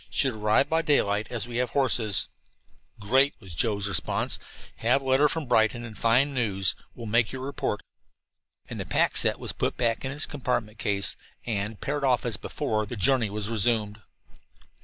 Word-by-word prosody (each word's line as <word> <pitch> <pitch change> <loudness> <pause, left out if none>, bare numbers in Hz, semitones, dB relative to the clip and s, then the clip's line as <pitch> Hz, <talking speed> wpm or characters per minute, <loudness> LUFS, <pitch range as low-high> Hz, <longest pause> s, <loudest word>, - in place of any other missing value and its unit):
Should 135 -3 +2
arrive 110 +4 +2
by 160 +1 +1
daylight, 110 -9 +2
as 120 -2 -3
we 120 -1 -4
have 125 0 0
horses." 115 -8 +1 0.7
"Great," 130 +7 +3
was 95 -7 -9
Joe's 100 +4 0
radio 100 - 0
response. - - 0 0.4
"Have 125 +4 +2
letter 135 +3 +4
from 160 +1 -3
Brighton 110 -1 +2
and 110 -2 -9
fine 125 +7 +3
news. 100 -7 +1 0.2
Will 120 - -8
make 115 +1 +2
your 130 -1 -6
report." 140 +1 -3 0.8
And - - -7
the - - -3
pack - - +2
set - - +2
was - - -4
put - - -2
back 115 -2 0
in 130 - -2
its 145 +2 0
compact 120 -6 -3
case, 100 -1 0 0.3
and, 105 -2 -3
paired 145 0 -2
off 125 -3 +2
as 115 -3 0
before, 110 -8 -2
the 120 - -5
journey 120 +1 +3
was 105 0 -3
resumed. 110 -1 +1
115 Hz, 180 wpm, -27 LUFS, 105-130 Hz, 0.8 s, letter